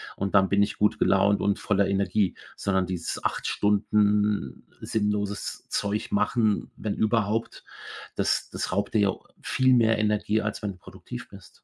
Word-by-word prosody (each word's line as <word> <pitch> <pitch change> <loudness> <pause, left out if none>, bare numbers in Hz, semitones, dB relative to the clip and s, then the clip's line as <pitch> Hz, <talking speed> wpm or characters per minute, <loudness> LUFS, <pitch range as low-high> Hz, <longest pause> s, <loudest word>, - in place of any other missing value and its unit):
Und 100 0 -3
dann 95 -1 +5
bin 100 +1 +3
ich 100 - -3
gut 105 - +2
gelaunt 100 +1 +3
und 100 0 +1
voller 100 -1 +1
Energie, 100 0 +1 0.2
sondern 95 -2 0
dieses 90 -2 -4
8 - - -1
Stunden 105 -4 +1 0.2
sinnloses 105 -1 -2
Zeug 100 +1 -2
machen, 105 +1 +1
wenn 105 -2 -3
überhaupt, 110 0 0 0.5
das - - 0
das - - -4
raubt 100 +3 -1
dir 110 - +3
ja 100 -1 +3 0.3
viel 130 0 +2
mehr 115 -2 +4
Energie, 105 0 +1
als 105 0 -4
wenn 105 - -1
du - - -18
produktiv 85 - -10
bist. - - -16
105 Hz, 160 wpm, -26 LUFS, 100-105 Hz, 0.5 s, dann